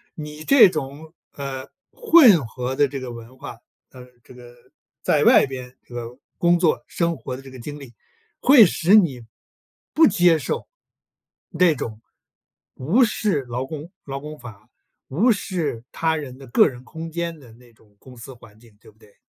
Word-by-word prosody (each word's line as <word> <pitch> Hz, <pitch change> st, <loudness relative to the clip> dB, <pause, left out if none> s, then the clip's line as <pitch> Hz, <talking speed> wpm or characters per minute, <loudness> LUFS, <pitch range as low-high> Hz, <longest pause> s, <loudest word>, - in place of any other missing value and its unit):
你 150 Hz, 0 st, -9 dB
这 275 Hz, -8 st, +7 dB
种， 155 Hz, 0 st, -7 dB, 0.2 s
呃， 135 Hz, -1 st, -6 dB, 0.2 s
混 300 Hz, -, +5 dB
合 125 Hz, +2 st, -5 dB
的 145 Hz, -, +3 dB
这 140 Hz, -, -7 dB
个 125 Hz, -2 st, -7 dB
文 120 Hz, +2 st, -12 dB
化， 120 Hz, -, -9 dB, 0.3 s
呃， 125 Hz, -1 st, -14 dB, 0.2 s
这 -, -, -16 dB
个 120 Hz, -1 st, -15 dB, 0.5 s
在 -, -, +1 dB
外 -, -, +6 dB
边 130 Hz, -1 st, -9 dB
这 -, -, -17 dB
个 120 Hz, 0 st, -7 dB, 0.2 s
工 175 Hz, 0 st, +3 dB
作、 170 Hz, -3 st, +1 dB
生 170 Hz, -2 st, -2 dB
活 130 Hz, -1 st, -7 dB
的 130 Hz, -, -10 dB
这 135 Hz, -1 st, -13 dB
个 130 Hz, -, -12 dB
经 145 Hz, +5 st, -8 dB
历， 135 Hz, -4 st, -13 dB, 0.5 s
会 255 Hz, -4 st, +7 dB
使 175 Hz, +2 st, +3 dB
你 145 Hz, -, +2 dB, 0.7 s
不 320 Hz, 0 st, +6 dB
接 175 Hz, -6 st, +3 dB
受 135 Hz, -, -4 dB, 0.8 s
那 170 Hz, -2 st, +2 dB
种， 110 Hz, -4 st, -6 dB, 0.8 s
无 180 Hz, -, +2 dB
视 210 Hz, -8 st, 0 dB
劳 125 Hz, +1 st, -5 dB
工 155 Hz, +3 st, -9 dB
劳 135 Hz, -1 st, -6 dB
工 150 Hz, +1 st, -9 dB
法， 110 Hz, -5 st, -13 dB, 0.4 s
无 190 Hz, -, +2 dB
视 165 Hz, -, -4 dB
他 160 Hz, -1 st, -1 dB
人 135 Hz, -5 st, -7 dB
的 135 Hz, -, -13 dB
个 120 Hz, -, +4 dB
人 125 Hz, -1 st, -13 dB
空 160 Hz, +4 st, -8 dB
间 170 Hz, 0 st, -4 dB
的 125 Hz, -6 st, -16 dB
那 120 Hz, +1 st, -20 dB
种 105 Hz, -2 st, -28 dB
公 130 Hz, -1 st, -15 dB
司 125 Hz, +3 st, -11 dB
环 115 Hz, -3 st, -18 dB
境， 115 Hz, -3 st, -21 dB
对 -, -, -18 dB
不 110 Hz, -, -24 dB
对？ 105 Hz, -2 st, -22 dB
140 Hz, 195 characters per minute, -22 LUFS, 125-165 Hz, 0.8 s, 这